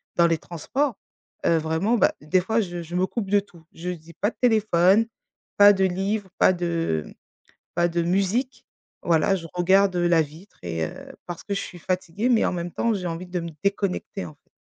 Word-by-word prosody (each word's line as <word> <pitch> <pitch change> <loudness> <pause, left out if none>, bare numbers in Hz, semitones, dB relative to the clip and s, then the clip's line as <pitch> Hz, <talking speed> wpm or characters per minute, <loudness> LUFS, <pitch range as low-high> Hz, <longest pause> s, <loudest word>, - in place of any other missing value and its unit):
dans 170 -1 +5
les 165 -1 +1
transports, 230 - -2 0.5
heu, 165 - +4
vraiment, 160 +9 +1
bah, 205 - +3
des 155 +5 +2
fois 220 +5 +1
je 175 -3 -4
je 170 +2 -7
me 180 +1 +2
coupe 205 -1 -4
de 205 - +5
tout. 175 -5 -19
Je 175 +2 -5
me 180 - -2
dis: 165 0 -15
«Pas 205 - +3
de - - -31
téléphone, 215 -3 +4 0.5
pas 205 0 +9
de 190 -1 +1
livres, 195 +2 -1
pas - - +5
de, 170 - -1
mmh, - - -13 0.6
pas 175 0 +3
de 170 0 -1
musique» 195 +9 0 0.4
voilà, 170 +3 +3
je 165 -3 -6
regarde 190 +2 +3
la 175 -1 +4
vitre 160 +6 -9
et 80 -2 -2 0.4
parce 175 -2 -7
que 200 - -3
je - - -1
suis 175 - -8
fatiguée, 185 +6 -1
mais 235 -3 +4
en - - 0
même 175 0 -3
temps, 230 +4 0
j'ai 185 -3 -3
envie 170 +2 -4
de 180 0 -3
me 170 - -5
déconnecter, 200 -1 -1
en 155 - -9
fait. - - -38
180 Hz, 210 wpm, -24 LUFS, 170-200 Hz, 0.6 s, pas